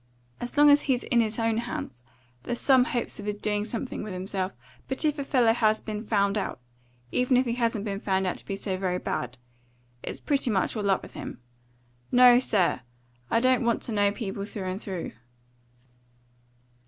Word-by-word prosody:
As 245 Hz, +3 st, -5 dB
long 295 Hz, 0 st, +8 dB
as 290 Hz, 0 st, +6 dB
he's 250 Hz, -2 st, +2 dB
in 240 Hz, -, +2 dB
his 220 Hz, -1 st, -1 dB
own 225 Hz, -1 st, +1 dB
hands, 125 Hz, -, -5 dB, 0.4 s
there's 240 Hz, -, -3 dB
some 260 Hz, -2 st, +5 dB
hopes 240 Hz, -3 st, -2 dB
of 205 Hz, -, -6 dB
his 210 Hz, 0 st, -2 dB
doing 210 Hz, 0 st, -1 dB
something 230 Hz, +3 st, -4 dB
with 210 Hz, -3 st, -5 dB
himself; 185 Hz, +1 st, -2 dB, 0.4 s
but 265 Hz, +4 st, -2 dB
if 300 Hz, -1 st, +1 dB
a -, -, -1 dB
fellow 245 Hz, -5 st, +3 dB
has 220 Hz, -2 st, +2 dB
been 215 Hz, 0 st, -5 dB
found 200 Hz, -1 st, +1 dB
out 195 Hz, -, -4 dB, 0.5 s
even 250 Hz, 0 st, +3 dB
if 255 Hz, -, +3 dB
he 235 Hz, -, -1 dB
hasn't 230 Hz, -3 st, 0 dB
been 200 Hz, -2 st, -3 dB
found 190 Hz, -2 st, 0 dB
out 180 Hz, -, -1 dB
to -, -, -10 dB
be 195 Hz, -, -2 dB
so 195 Hz, -1 st, -2 dB
very 185 Hz, -1 st, -1 dB
bad 125 Hz, -7 st, -3 dB, 0.6 s
it's -, -, -6 dB
pretty 280 Hz, -4 st, 0 dB
much 195 Hz, 0 st, 0 dB
all 205 Hz, -2 st, -1 dB
up 195 Hz, -, +2 dB
with -, -, -11 dB
him. -, -, -7 dB, 0.7 s
No, 245 Hz, 0 st, +8 dB
sir. 195 Hz, -, +1 dB, 0.5 s
I 230 Hz, -, +3 dB
don't 255 Hz, +1 st, +3 dB
want 235 Hz, -1 st, +1 dB
to -, -, -3 dB
know 205 Hz, -1 st, +3 dB
people 200 Hz, -2 st, -4 dB
through 200 Hz, -1 st, -6 dB
and 190 Hz, +3 st, -5 dB
through." 185 Hz, -4 st, -5 dB
215 Hz, 195 wpm, -27 LUFS, 195-245 Hz, 0.7 s, long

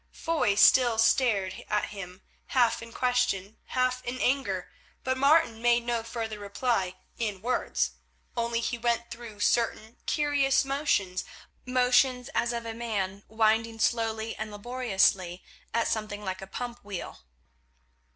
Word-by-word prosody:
Foy 310 Hz, -11 st, 0 dB
still 240 Hz, +2 st, +6 dB
stared 215 Hz, -5 st, +2 dB
at 210 Hz, -, 0 dB
him, 190 Hz, -2 st, -9 dB, 0.2 s
half 245 Hz, -3 st, +2 dB
in 230 Hz, 0 st, -9 dB
question, 245 Hz, -5 st, 0 dB
half 255 Hz, 0 st, 0 dB
in 250 Hz, +1 st, -4 dB
anger, 245 Hz, -10 st, 0 dB, 0.3 s
but 260 Hz, 0 st, 0 dB
Martin 275 Hz, -4 st, +3 dB
made 240 Hz, 0 st, +3 dB
no 240 Hz, -1 st, 0 dB
further 225 Hz, -2 st, -5 dB
reply 200 Hz, -2 st, -1 dB, 0.2 s
in 210 Hz, -4 st, -2 dB
words. 245 Hz, +5 st, 0 dB, 0.4 s
Only 235 Hz, -1 st, 0 dB
he 235 Hz, 0 st, -2 dB
went 235 Hz, 0 st, 0 dB
through 225 Hz, -3 st, -9 dB
certain 225 Hz, 0 st, +1 dB
curious 285 Hz, -2 st, +2 dB
motions, 270 Hz, -10 st, 0 dB, 0.4 s
motions 250 Hz, 0 st, +3 dB
as 235 Hz, -, +1 dB
of 235 Hz, -1 st, -4 dB
a 225 Hz, -, -4 dB
man 205 Hz, -4 st, -3 dB
winding 225 Hz, +1 st, +2 dB
slowly 225 Hz, 0 st, 0 dB
and 215 Hz, 0 st, -4 dB
laboriously 205 Hz, -5 st, 0 dB, 0.3 s
at 230 Hz, 0 st, +1 dB
something 210 Hz, -1 st, -3 dB
like 190 Hz, 0 st, -3 dB
a 195 Hz, -, -8 dB
pump 245 Hz, +4 st, -6 dB
wheel. 200 Hz, -3 st, -6 dB
230 Hz, 135 wpm, -28 LUFS, 205-250 Hz, 0.4 s, still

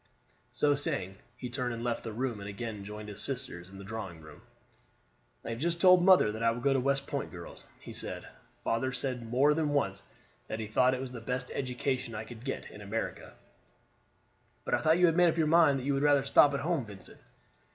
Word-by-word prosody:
So 145 Hz, +4 st, +2 dB
saying, 95 Hz, -9 st, -2 dB, 0.2 s
he 125 Hz, -, -5 dB
turned 125 Hz, -2 st, -2 dB
and 115 Hz, -, -6 dB
left 120 Hz, -1 st, -2 dB
the 115 Hz, -, -5 dB
room 120 Hz, 0 st, -2 dB
and 100 Hz, 0 st, -6 dB
again 105 Hz, 0 st, -5 dB
joined 105 Hz, +1 st, -8 dB
his 105 Hz, -, -5 dB
sisters 125 Hz, -10 st, -4 dB
in 95 Hz, -, -12 dB
the 100 Hz, -, -9 dB
drawing 95 Hz, -5 st, -6 dB
room. 75 Hz, +1 st, -14 dB, 1.0 s
"I -, -, -3 dB
have 115 Hz, -, -4 dB
just 170 Hz, +3 st, 0 dB
told 180 Hz, -1 st, +7 dB
mother 185 Hz, -, +6 dB
that 110 Hz, +1 st, -6 dB
I 115 Hz, -, +4 dB
will 115 Hz, +1 st, -2 dB
go 135 Hz, +3 st, +2 dB
to 135 Hz, -, +2 dB
West 140 Hz, +1 st, +1 dB
Point, 140 Hz, -2 st, -3 dB
girls," 85 Hz, -2 st, -10 dB
he -, -, -10 dB
said. -, -, -2 dB, 0.4 s
"Father 125 Hz, +3 st, 0 dB
said 125 Hz, -2 st, -3 dB
more 135 Hz, +5 st, +4 dB
than 155 Hz, -1 st, 0 dB
once 100 Hz, -10 st, 0 dB, 0.5 s
that 110 Hz, -, -4 dB
he 110 Hz, -, -3 dB
thought 125 Hz, +4 st, +3 dB
it 130 Hz, -, -5 dB
was 130 Hz, -1 st, -5 dB
the 120 Hz, -2 st, -7 dB
best 125 Hz, +2 st, -3 dB
education 125 Hz, -2 st, -2 dB
I 105 Hz, -, -4 dB
could 115 Hz, 0 st, -11 dB
get 135 Hz, -, -5 dB
in 105 Hz, -, -11 dB
America." 105 Hz, +3 st, -4 dB, 1.3 s
"But -, -, -2 dB
I -, -, +4 dB
thought 160 Hz, +1 st, +4 dB
you 180 Hz, -, +5 dB
had 165 Hz, -2 st, +3 dB
made 175 Hz, -1 st, +6 dB
up 165 Hz, -, -2 dB
your 160 Hz, -, +3 dB
mind 155 Hz, -3 st, +5 dB
that 130 Hz, -, -5 dB
you 140 Hz, +1 st, +1 dB
would 135 Hz, -, 0 dB
rather 145 Hz, -2 st, +4 dB
stop 140 Hz, +1 st, +6 dB
at -, -, -2 dB
home, 165 Hz, -3 st, 0 dB
Vincent?" 100 Hz, -3 st, -7 dB
125 Hz, 225 wpm, -30 LUFS, 110-140 Hz, 1.3 s, told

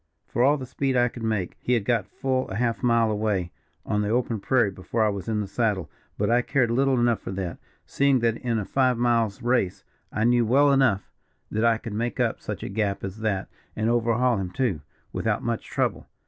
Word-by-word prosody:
For 120 Hz, -, -2 dB
all 140 Hz, +4 st, +5 dB
the 130 Hz, -, -6 dB
speed 130 Hz, +1 st, -1 dB
I 120 Hz, 0 st, +3 dB
could 120 Hz, -, -10 dB
make, 110 Hz, -5 st, -2 dB
he 125 Hz, -, 0 dB
had 115 Hz, -5 st, +1 dB
got 115 Hz, -4 st, +1 dB
full 130 Hz, -1 st, -2 dB
a 95 Hz, -, -5 dB
half 115 Hz, +1 st, 0 dB
mile 115 Hz, -3 st, +3 dB
away 105 Hz, -5 st, -1 dB, 0.3 s
on 105 Hz, -, 0 dB
the 105 Hz, -, -1 dB
open 115 Hz, -1 st, 0 dB
prairie 120 Hz, -1 st, +2 dB
before 95 Hz, +4 st, -2 dB
I 110 Hz, -, +3 dB
was 100 Hz, -1 st, -5 dB
in 105 Hz, -1 st, 0 dB
the 100 Hz, -, -4 dB
saddle; 105 Hz, -3 st, -1 dB, 0.3 s
but -, -, 0 dB
I 120 Hz, +1 st, +3 dB
cared 125 Hz, -2 st, +1 dB
little 135 Hz, +1 st, +2 dB
enough 120 Hz, -1 st, +2 dB
for -, -, -7 dB
that, 95 Hz, -3 st, -4 dB, 0.3 s
seeing 140 Hz, -1 st, +2 dB
that 115 Hz, -1 st, +1 dB
in 120 Hz, -2 st, -1 dB
a 105 Hz, -, -2 dB
five 130 Hz, 0 st, +2 dB
miles' 115 Hz, -4 st, +1 dB
race, 120 Hz, -7 st, +1 dB, 0.3 s
I 110 Hz, -, -1 dB
knew 120 Hz, +1 st, +4 dB
well 140 Hz, +5 st, +4 dB
enough 130 Hz, -8 st, +2 dB, 0.4 s
that 110 Hz, +1 st, 0 dB
I 115 Hz, -1 st, +4 dB
could 110 Hz, -1 st, -7 dB
make 120 Hz, +3 st, -2 dB
up -, -, +1 dB
such -, -, -5 dB
a -, -, -4 dB
gap 100 Hz, -1 st, -1 dB
as 95 Hz, +2 st, -5 dB
that, 105 Hz, -4 st, -1 dB, 0.3 s
and 110 Hz, +2 st, +1 dB
overhaul 120 Hz, 0 st, +2 dB
him, 95 Hz, -2 st, -3 dB
too, 105 Hz, -, -1 dB, 0.3 s
without -, -, -1 dB
much -, -, -2 dB
trouble. -, -, -2 dB
115 Hz, 220 wpm, -25 LUFS, 105-125 Hz, 0.4 s, all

